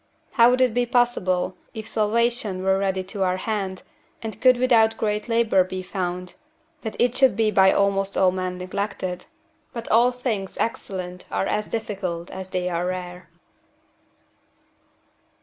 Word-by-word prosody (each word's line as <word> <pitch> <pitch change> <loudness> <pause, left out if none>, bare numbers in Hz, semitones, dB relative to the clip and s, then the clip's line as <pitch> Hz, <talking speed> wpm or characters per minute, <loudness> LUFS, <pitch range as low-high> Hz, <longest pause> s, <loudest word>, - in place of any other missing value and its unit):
How 235 -1 +6
would 250 +1 +2
it 250 -3 +3
be 245 +1 +1
possible, 190 -7 +1 0.2
if 220 0 -6
salvation 220 -3 0
were 190 0 +2
ready 190 -1 0
to 195 +2 -7
our 185 -1 +1
hand, 195 -2 -3 0.4
and 220 -2 -6
could 255 -1 +6
without 225 -3 +4
great 210 +1 -2
labour 230 -5 +3
be 185 0 -6
found, 180 -1 -4 0.5
that 220 - -5
it 245 0 +2
should 265 -6 +4
be 220 -1 +2
by 190 -1 +5
almost 195 0 +1
all 185 -1 +4
men 185 0 -3
neglected? 185 -1 -4 0.5
But 235 -2 -6
all 235 +3 +5
things 230 -6 -3
excellent 180 -5 -4
are - - 0
as 210 +1 -1
difficult 185 -6 -4
as 190 0 -6
they 180 -1 -2
are 175 0 -1
rare. 180 0 -6
195 Hz, 150 wpm, -24 LUFS, 185-230 Hz, 0.5 s, How